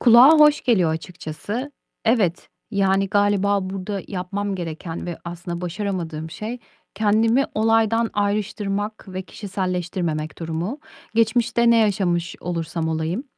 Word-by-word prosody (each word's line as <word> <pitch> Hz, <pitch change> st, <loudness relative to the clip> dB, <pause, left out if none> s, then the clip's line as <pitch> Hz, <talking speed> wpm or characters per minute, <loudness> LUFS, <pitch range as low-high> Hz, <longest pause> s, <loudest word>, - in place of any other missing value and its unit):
Kulağa 240 Hz, +3 st, +8 dB
hoş 300 Hz, -1 st, +6 dB
geliyor 190 Hz, -10 st, +3 dB
açıkçası. 180 Hz, -, -5 dB, 0.3 s
Evet, 210 Hz, -7 st, +2 dB, 0.2 s
yani, 195 Hz, -1 st, +2 dB
galiba 200 Hz, -1 st, +2 dB
burada 195 Hz, 0 st, -4 dB
yapmam 195 Hz, +2 st, -3 dB
gereken 165 Hz, -1 st, -5 dB
ve 175 Hz, -, -5 dB
aslında 175 Hz, 0 st, -5 dB
başaramadığım 175 Hz, -4 st, -3 dB
şey 220 Hz, +8 st, -5 dB, 0.4 s
kendimi 220 Hz, +5 st, +3 dB
olaydan 225 Hz, +1 st, +3 dB
ayrıştırmak 205 Hz, 0 st, -1 dB
ve 185 Hz, 0 st, -4 dB
kişiselleştirmemek 180 Hz, -6 st, -3 dB
durumu. 170 Hz, -, -3 dB, 0.4 s
Geçmişte 235 Hz, +1 st, +3 dB
ne 230 Hz, -, +6 dB
yaşamış 185 Hz, -6 st, +1 dB
olursam 165 Hz, -1 st, -2 dB
olayım, 160 Hz, -, -2 dB
195 Hz, 110 wpm, -22 LUFS, 175-220 Hz, 0.4 s, Kulağa